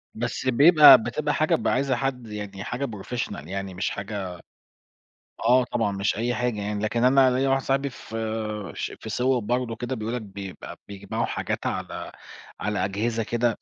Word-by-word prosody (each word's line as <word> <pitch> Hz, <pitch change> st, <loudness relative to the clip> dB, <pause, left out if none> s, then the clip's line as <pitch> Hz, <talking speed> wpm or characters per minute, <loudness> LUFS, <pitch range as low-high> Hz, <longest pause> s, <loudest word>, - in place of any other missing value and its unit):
بس 120 Hz, +3 st, -3 dB
بيبقى 150 Hz, +5 st, +9 dB
بتبقى 150 Hz, +5 st, -1 dB
حاجة 155 Hz, +2 st, +2 dB
ب -, -, -2 dB
عايزة 130 Hz, 0 st, +2 dB
حد 125 Hz, -2 st, -3 dB
يعني 105 Hz, -2 st, -6 dB
حاجة 130 Hz, +3 st, -3 dB
Professional 105 Hz, -, -5 dB
يعني 95 Hz, 0 st, -4 dB
مش 90 Hz, -, -1 dB
حاجة 100 Hz, -3 st, -5 dB, 1.1 s
آه 125 Hz, +2 st, +5 dB
طبعًا 115 Hz, -4 st, -1 dB
مش 100 Hz, +1 st, -1 dB
أي 120 Hz, +2 st, 0 dB
حاجة 120 Hz, -4 st, -1 dB
يعني. 105 Hz, +1 st, -3 dB
لكن 115 Hz, +3 st, 0 dB
أنا 130 Hz, 0 st, +5 dB
ليَّ 130 Hz, +2 st, +1 dB
واحد 135 Hz, 0 st, +2 dB
صاحبي 135 Hz, +1 st, 0 dB
ف 115 Hz, -3 st, -10 dB, 0.6 s
ش -, -, -4 dB
في 110 Hz, -, -8 dB
صوّب 125 Hz, -1 st, 0 dB
برضه 120 Hz, -1 st, 0 dB
كده، 120 Hz, +3 st, -4 dB
بيقُول 110 Hz, +1 st, -4 dB
لك 120 Hz, -, -3 dB
بيبقى 100 Hz, -2 st, -8 dB
بيجمعوا 100 Hz, -1 st, -3 dB
حاجات -, -, -3 dB
على -, -, -4 dB, 0.5 s
على 100 Hz, -2 st, -1 dB
أجهزة 110 Hz, +3 st, -1 dB
كده 120 Hz, 0 st, 0 dB
115 Hz, 170 wpm, -25 LUFS, 105-130 Hz, 1.1 s, بيبقى